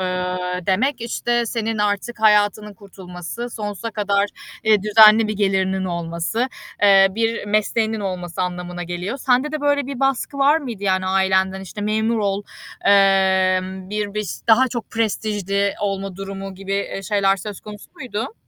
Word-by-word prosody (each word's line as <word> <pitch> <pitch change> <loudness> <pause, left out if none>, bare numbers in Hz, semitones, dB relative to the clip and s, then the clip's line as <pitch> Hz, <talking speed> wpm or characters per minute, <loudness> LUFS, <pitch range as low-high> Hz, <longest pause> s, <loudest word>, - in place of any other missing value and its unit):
eee, 180 0 -2 0.3
demek, 235 +8 +1
işte, 240 0 -1
senin 225 -1 -2
artık 210 +3 -1
hayatının 210 -1 +3
kurtulması, 190 +3 -8
sonsuza 210 0 -5
kadar, 200 -1 +1 0.4
eee, 215 -2 +4
düzenli 215 +1 +7
bir - - -1
gelirinin 190 -1 0
olması, 170 +7 -2 0.3
eee, 195 -1 +7
bir 225 +2 -1
mesleğinin 220 +1 0
olması 185 -2 -4
anlamına 180 0 -4
geliyor. 180 +8 -4
Sende 260 +3 +1
de 305 - -3
böyle 285 -1 +1
bir 275 -2 -6
baskı 270 +1 0
var 285 +3 +4
mıydı, 240 -9 -7
yani, 185 -1 +1
ailenden? 190 0 +1
İşte, 195 +2 -8
memur 220 +2 0
ol, 200 -1 -1 0.4
emm, 190 -1 +3
bir 210 -1 -3
biş 210 -1 -3 0.2
daha 250 +4 +5
çok 240 -2 -6
prestijli 205 -3 -1
olma 195 -2 -3
durumu 195 0 -7
gibi, 195 +1 -6
eee, 195 0 -3
şeyler 195 -1 +2
söz 200 +1 -7
konusu 210 -1 -11
muydu? 240 - -5
205 Hz, 150 wpm, -21 LUFS, 190-225 Hz, 0.4 s, düzenli